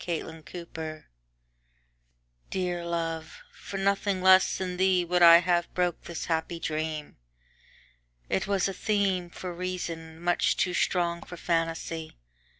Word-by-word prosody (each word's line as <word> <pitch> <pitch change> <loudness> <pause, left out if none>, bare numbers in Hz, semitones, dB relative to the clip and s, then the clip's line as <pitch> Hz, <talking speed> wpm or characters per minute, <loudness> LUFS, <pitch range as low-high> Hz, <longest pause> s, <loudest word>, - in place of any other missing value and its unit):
The 160 -2 -4
Dream 160 -2 -7 1.5
DEAR 180 -2 -2
love, 165 - -4
for 200 - -7
nothing 195 0 +1
less 190 0 +6
than 180 -1 -4
theeWould 180 -2 +3
I 170 -1 +10
have 175 -1 +1
broke 180 -2 0
this 170 - -5
happy 165 +1 -1
dream; 155 -1 -3 1.1
It 190 - -1
was 200 -2 +2
a 195 - -3
themeFor 185 -4 -1
reason, 170 -3 -5
much 175 +1 +1
too 180 - +1
strong 170 -1 +1
for 180 - -9
fantasy. 165 -1 -2
175 Hz, 120 wpm, -28 LUFS, 165-185 Hz, 1.5 s, I